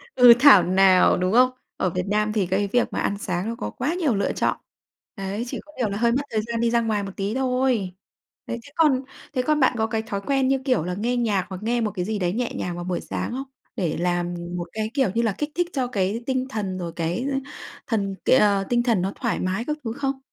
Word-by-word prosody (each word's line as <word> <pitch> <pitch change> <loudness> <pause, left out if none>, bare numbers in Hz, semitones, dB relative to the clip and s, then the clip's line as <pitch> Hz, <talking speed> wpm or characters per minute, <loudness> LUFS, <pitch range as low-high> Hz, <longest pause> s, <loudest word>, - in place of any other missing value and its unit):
Ừ, 245 -2 +9
thảo 250 -9 +8
nào, 185 +1 +5
đúng 185 +2 0
không? 250 +2 +6 0.3
Ở 185 - +1
Việt 180 +1 -3
Nam 210 +1 +1
thì 210 -3 +1
cái 195 +3 0
việc 245 +5 0
mà - - -1
ăn 200 - -1
sáng 185 -1 -3
nó 230 - -3
có 105 - -4
quá 280 - -2
nhiều 320 - +1
lựa 200 - 0
chọn, - - 0 0.6
đấy, 195 +2 -3
chỉ - - -5
có 300 - -16
điều 240 -5 0
là 200 - -3
hơi 235 +2 +2
mất 255 +4 +1
thời 220 - +1
gian 230 +1 -4
đi 235 0 +2
ra 235 0 +3
ngoài 215 -3 0
một 195 - -5
tí 200 +3 -2
thôi. 250 -7 0 0.5
Đấy, 235 - -4
thế 285 - -15
còn 300 -6 +3 0.3
thế 255 - +1
còn 300 +4 +1
bạn 260 -2 +3
có 220 0 +1
cái 225 0 -1
thói 210 -3 -4
quen 270 +4 +1
như 270 0 +2
kiểu 255 - +2
là, 180 +2 -3
nghe 235 +6 -1
nhạc 210 -6 +1
hoặc 190 +1 -7
nghe 235 +2 0
một 215 -2 0
cái 180 -3 -3
gì 215 +1 -2
đấy 180 -1 0
nhẹ 240 +2 -2
nhàng 175 -1 -3
vào 175 - -5
buổi 180 0 -2
sáng - - -4
không? 260 +3 -3 0.3
Để 170 -5 -1
làm 175 0 0 0.2
một 175 - -3
cái, 220 0 -3
kiểu 270 -7 +2
như 230 - +3
là, 225 -2 +1
kích 295 - -2
thích 350 0 +1
cho 260 -3 0
cái 210 0 -1
tinh 260 -1 -1
thần 200 -7 -3
rồi 175 -2 -4
cái 170 +9 -2 0.6
thần 200 -4 -1
cái - - +5
ờ, 200 -4 +3
tinh 240 -1 +2
thần 230 -6 +2
nó 190 +2 -1
thoải 235 -4 -2
mái 190 +5 -2
các 300 +2 -2
thứ 225 -2 -3
không? 270 +1 -2
220 Hz, 260 wpm, -24 LUFS, 190-250 Hz, 0.6 s, Ừ